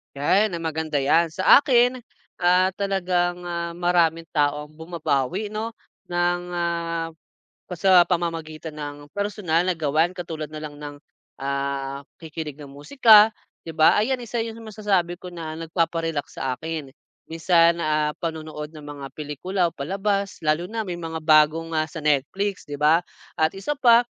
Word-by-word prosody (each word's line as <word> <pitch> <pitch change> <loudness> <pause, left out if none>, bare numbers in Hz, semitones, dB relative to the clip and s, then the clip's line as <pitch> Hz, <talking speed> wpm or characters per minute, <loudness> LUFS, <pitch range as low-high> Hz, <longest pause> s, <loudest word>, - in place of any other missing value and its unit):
Yan, 190 +8 +2
maganda 160 -2 -2
yan. 160 +5 +4
Sa 185 - +7
akin, 250 -2 +3 0.4
ah, 180 +1 +4
talagang, 180 -3 0
ah, 170 -1 -4
maraming 170 -2 +1
tao 150 -1 0
ang - - -21
bumabawi 165 +3 -2
'no 220 +2 -4 0.3
ng, 175 0 0
ah, 170 -1 -2 0.6
pa - - -7
sa 180 0 +6
pamamagitan 165 -3 -3
ng 145 -1 -5 0.2
personal 200 -5 0
na 185 - +1
gawain 160 +3 +1
katulad 165 -4 -6
nalang 150 -1 -7
ng, 145 0 -8 0.5
ah, 140 0 -3 0.2
pakikinig 160 -2 -6
ng 140 - -10
musika. 215 - +5 0.3
'Di 165 - -6
ba, 160 0 +5
ayan 245 +4 +1
isa 240 0 -5
yung 225 0 -6
masasabi 195 -5 -1
ko 180 0 -9
na 160 -2 -6
nagpaparelax 165 -2 -2
sa 130 -1 0
akin. 160 -3 -5 0.4
Minsan, 170 +1 +3
ah, 150 -1 +1
panonood 155 -2 -5
ng 150 -2 -11
mga 145 -1 -8
pelikula 155 +5 -2
o - - -24
palabas 195 +6 -2
lalo 155 +3 +1
na 225 0 -3
may 175 -2 -4
mga 165 -1 -5
bago 155 0 +5 0.2
nga 155 -1 +1
sa 165 - -7
Netflix 180 +8 0
'di 145 - -5
ba. 155 +3 +5 0.4
At 160 0 +2
isa 195 +10 -2
pa 240 -2 +6
165 Hz, 150 wpm, -23 LUFS, 155-185 Hz, 0.6 s, Sa